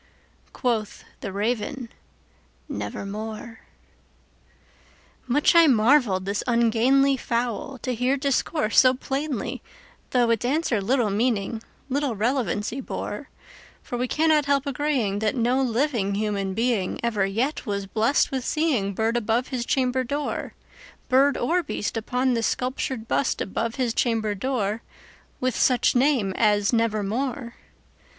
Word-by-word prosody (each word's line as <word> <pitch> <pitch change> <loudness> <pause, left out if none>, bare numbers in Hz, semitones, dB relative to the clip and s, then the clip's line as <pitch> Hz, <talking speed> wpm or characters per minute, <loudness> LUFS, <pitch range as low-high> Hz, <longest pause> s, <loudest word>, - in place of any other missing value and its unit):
Quoth 230 -5 -2 0.2
the 200 - -5
Raven, 235 +5 -2 0.8
"Nevermore."Much 225 - -6
I 335 -1 +7
marvelled 225 -6 +3
this 200 +1 -2
ungainly 245 +4 +3
fowl 240 +2 -2
to 255 - -1
hear 250 +4 +1
discourse 275 -3 +1
so 255 0 +5
plainly, 270 -1 -3 0.5
Though 240 -2 +2
its 230 -1 0
answer 255 -4 0
little 230 0 +1
meaning—little 235 +4 -2
relevancy 230 +1 -1
bore; - - -5 0.5
For - - -5
we 250 +1 -1
cannot 310 +1 +2
help 280 0 +2
agreeing 270 -8 0
that 215 +2 0
no 250 +2 +2
living 235 -5 0
human 200 -2 -2
beingEver 220 -2 0
yet 250 +9 -1
was 200 -1 -2
blessed 225 +7 +1
with 265 -2 -2
seeing 255 - 0
bird 225 +3 0
above 235 +2 0
his 245 -2 -3
chamber 260 -1 +1
door, 285 +4 -3 0.5
Bird 270 +2 +4
or 345 +9 +1
beast 290 -9 -4
upon 250 +3 0
the 230 - 0
sculptured 250 -1 -2
bust 270 - 0
above 225 +4 -2
his 250 -3 0
chamber 225 -4 0
door, 215 -1 -2 0.6
With 255 -2 0
such 250 -2 +3
name 245 -7 +2
as 210 -1 +3
"Nevermore." 230 +3 -1
240 Hz, 120 wpm, -24 LUFS, 215-265 Hz, 0.8 s, I